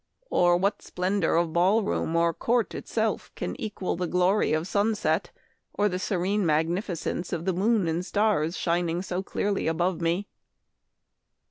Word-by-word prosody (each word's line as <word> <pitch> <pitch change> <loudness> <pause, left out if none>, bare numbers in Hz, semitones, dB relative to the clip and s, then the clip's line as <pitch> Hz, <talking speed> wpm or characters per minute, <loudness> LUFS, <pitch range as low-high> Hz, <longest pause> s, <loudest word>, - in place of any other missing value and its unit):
or 175 0 +4
what 200 +3 0
splendor 185 -1 0
of 165 -1 +1
ball 190 +6 +3
room 165 -4 -1
or 170 0 +3
court 235 +6 0
itself - - -2
can - - -4
equal 205 -4 -3
the 180 0 -2
glory 180 +3 +2
of 155 +2 0
sun 210 +3 +1
set 175 -1 0 0.5
or 205 - +2
the 185 -2 -2
serene 195 +2 0
magnificence 170 +2 -1
of 170 -1 -3
the 190 - +1
moon 200 +1 +2
and 165 +2 -1
stars 195 -5 +1
shining 170 +1 0
so 185 -1 -2
clearly 200 0 -1
above 175 +2 0
me 170 +5 0
180 Hz, 155 wpm, -27 LUFS, 170-200 Hz, 0.5 s, or